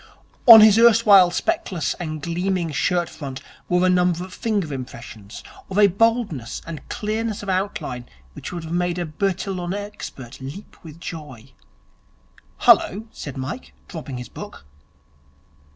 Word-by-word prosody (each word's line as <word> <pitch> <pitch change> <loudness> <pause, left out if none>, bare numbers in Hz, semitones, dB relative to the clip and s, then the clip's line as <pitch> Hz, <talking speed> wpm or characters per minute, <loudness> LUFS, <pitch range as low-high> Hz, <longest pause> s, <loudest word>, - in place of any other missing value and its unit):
On 225 -2 +12
his 215 0 +7
erstwhile 215 -5 +7
speckless 260 - -1
and 155 -4 -5
gleaming 175 0 -1
shirt 175 +4 0
front 135 -3 -7 0.3
were 180 +1 +3
number 180 -1 +2
of 185 +1 -10
finger 205 -11 -2
impressions, 120 -5 -9 0.3
of 190 - -4
a 210 - +7
boldness 200 - 0
and 165 -2 -9
clearness 215 0 -3
of 200 - -6
outline 165 -10 -3 0.2
which - - -8
would 175 -2 -6
have 160 +1 -6
made 175 0 0
a 175 - -2
Bertillon 185 +2 -2
expert 205 - -8
leap 140 +10 -9
with 160 -1 -12
joy. 135 -8 -9 1.1
'Hullo!' 210 +4 +4
said 140 -2 -8
Mike 135 - -6
dropping 150 -7 -7
his 125 - -7
book. - - -10
180 Hz, 135 wpm, -22 LUFS, 150-200 Hz, 1.1 s, On